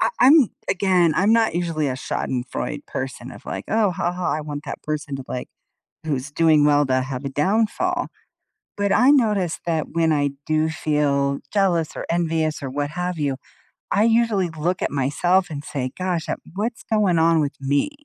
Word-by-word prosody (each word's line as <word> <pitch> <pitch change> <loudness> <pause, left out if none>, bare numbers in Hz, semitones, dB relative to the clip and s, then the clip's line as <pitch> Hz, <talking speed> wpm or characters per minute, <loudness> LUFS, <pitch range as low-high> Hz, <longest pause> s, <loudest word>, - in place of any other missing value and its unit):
I - - +3
I'm 270 -1 +7 0.2
Again, 180 -3 +3
I'm 200 +4 +4
not 225 -6 +3
usually 165 -4 -1
a 130 - -2
schadenfreude 130 +2 -3
person 130 -1 -5
of, - - -13
like, - - -4
"Oh 215 -3 +2
ha 175 0 -1
ha, 180 0 -2
I 155 - -1
want 145 0 -6
that - - -6
person 150 -2 -3
to, 135 - -8
like 125 - -5 0.6
who's 145 -2 -2
doing 155 -1 +4
well 145 0 +4
to 130 0 +2
have 130 +1 -5
a - - -1
downfall." 205 +10 0 0.7
But 200 -1 0
I 255 +3 +5
noticed 210 - +2
that 160 -2 -1
when 165 0 +2
I 145 -2 +1 0.2
do 155 0 +2
feel 140 -3 0
jealous 180 -6 +2
or - - -4
envious 165 -2 0
or 135 - -3
what 145 +2 -3
have 180 +2 -3
you, 140 -3 -1 0.5
I 205 - +3
usually 225 -5 +2
look 165 +3 -2
at - - 0
myself 165 +7 +1
and 145 -1 -6
say, 130 -4 -3
"Gosh, 180 -3 -2
uh, - - -1 0.2
what's 220 +4 -3
going 205 -6 +2
on 165 0 +4
with 145 -1 -1
me?" 140 - +1
160 Hz, 185 wpm, -22 LUFS, 145-185 Hz, 0.7 s, I'm